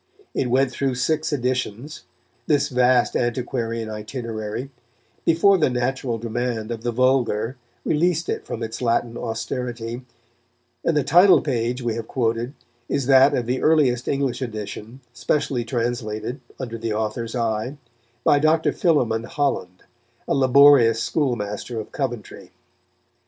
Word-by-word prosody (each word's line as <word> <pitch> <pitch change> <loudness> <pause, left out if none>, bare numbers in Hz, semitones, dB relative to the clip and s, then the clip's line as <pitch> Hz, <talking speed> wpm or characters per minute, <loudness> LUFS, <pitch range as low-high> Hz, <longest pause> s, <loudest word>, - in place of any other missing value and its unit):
It 125 - -1
went 130 +1 +2
through 130 +1 -1
six 155 +5 0
editions, 130 0 -3 0.4
this 145 -2 +2
vast 125 -1 +3
antiquarian 115 -2 -2
itinerary, 110 +2 -5 0.5
before 185 +4 +4
the 155 - +3
natural 125 -1 -1
demand 115 0 -3
of 115 -1 -4
the 120 +1 -1
vulgar 125 -2 +1 0.3
released 165 +1 +1
it - - -2
from 115 - -5
its 115 +2 -5
Latin 115 -1 0
austerity; 120 +1 -4 0.8
and 165 - +1
the 145 - +2
title 175 +7 +6
page 125 -2 -2
we 120 -1 0
have 115 0 -5
quoted 120 +2 -1 0.3
is 140 - 0
that 135 +1 +6
of 120 - -1
the 125 +2 -1
earliest 140 -6 +3
English 135 -2 -1
edition, 110 +1 -6
specially 120 +2 -1
translated, 120 0 -3 0.2
under 115 -3 -5
the 115 -1 -2
author's 110 +2 -3
eye, 115 +3 -2 0.5
by 145 - +4
Dr. 155 +2 +3
Philémon 120 -10 +1
Holland, 105 -11 -2 0.4
a - - +1
laborious 135 -3 +6
schoolmaster 115 -5 -2
of 110 - -8
Coventry. 120 -6 -5
125 Hz, 130 wpm, -23 LUFS, 115-135 Hz, 0.8 s, title